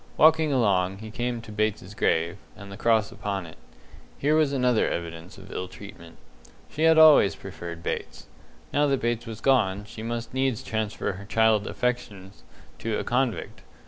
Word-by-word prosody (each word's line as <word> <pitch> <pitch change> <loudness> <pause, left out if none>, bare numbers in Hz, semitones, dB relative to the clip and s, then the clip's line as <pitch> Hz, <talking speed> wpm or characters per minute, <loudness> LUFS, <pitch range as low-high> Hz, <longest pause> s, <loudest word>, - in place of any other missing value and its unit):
Walking 160 -1 +5
along, 95 -7 +2
he 110 +1 -9
came 120 +1 -3
to 110 - -10
Bates's 105 -2 -2
grave, 85 -1 0 0.2
and 100 -1 -11
the - - -7
cross 110 -1 +2
upon 100 -3 -4
it. 80 - -13 0.6
Here 145 +2 +1
was 155 -2 +3
another 125 -4 +2
evidence 85 +1 -6
of 95 0 -13
ill 90 - -4
treatment. 90 -4 -12 0.5
She 155 +2 0
had 160 0 +6
always 155 -10 +7
preferred 85 -3 -8
Bates. - - -5 0.5
Now 145 +1 +3
that 135 -2 +1
Bates 120 0 -2
was 115 -1 -7
gone, 105 -7 +2
she 110 - -10
must 115 +1 -4
needs 130 -3 0
transfer 110 +1 -2
her 100 +1 -9
childish 110 -1 +2
affections 105 -6 -4 0.4
to 110 -1 -2
a - - -2
convict. 125 -1 -1
110 Hz, 170 wpm, -26 LUFS, 95-125 Hz, 0.6 s, always